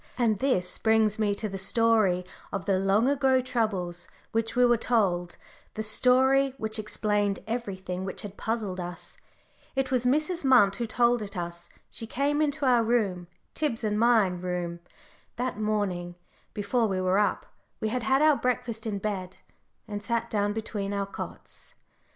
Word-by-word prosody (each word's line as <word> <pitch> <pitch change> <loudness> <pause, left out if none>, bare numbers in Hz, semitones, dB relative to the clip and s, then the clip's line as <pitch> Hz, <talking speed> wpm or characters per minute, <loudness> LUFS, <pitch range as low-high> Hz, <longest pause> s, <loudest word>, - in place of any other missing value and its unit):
And 225 -5 +2
this 185 -10 0
brings 220 -1 +3
me 205 -2 +1
to 215 - -3
the 195 -1 -5
story 205 -3 +2 0.3
of 195 -2 -3
the 195 -2 +2
long 195 +5 +3
ago 270 -2 +3
troubles 205 -9 -2 0.2
which 225 0 -1
we 250 0 +5
were 240 0 +5
told 190 -7 0 0.4
the 220 - -3
story 260 +4 +3
which 220 -1 -3
explained 210 -1 0
everything 190 -6 -4
which 190 - -4
had 205 -1 -7
puzzled 215 -5 -3
us. 175 -1 -7 0.6
It 270 -1 0
was 250 -2 +1
Mrs. 310 +7 +1
Munt 245 -7 +5
who 235 - -2
told 240 +1 +2
it 200 -2 -6
us. 170 0 -6 0.2
She 225 - -7
came 285 +5 0
into 290 -1 0
our 245 -3 +4
room 205 -7 0 0.3
Tib's 275 -7 -2
and 210 -1 0
my 230 -2 +5
room 180 -1 -3 0.6
that 250 -3 -3
morning 195 -5 -1 0.4
before 225 +3 +1
we 190 -2 -1
were 185 +1 +2
up 210 - 0 0.3
we 220 - -1
had 250 +3 -1
had 265 +4 +2
our 310 -1 +6
breakfast 240 -3 -2
in 205 -2 -2
bed 190 -3 -4 0.5
and 205 -1 -5
sat 230 +3 -2
down 205 -1 +1
between 205 -2 -3
our 200 0 -1
cots. 195 - -9
215 Hz, 165 wpm, -27 LUFS, 195-245 Hz, 0.6 s, our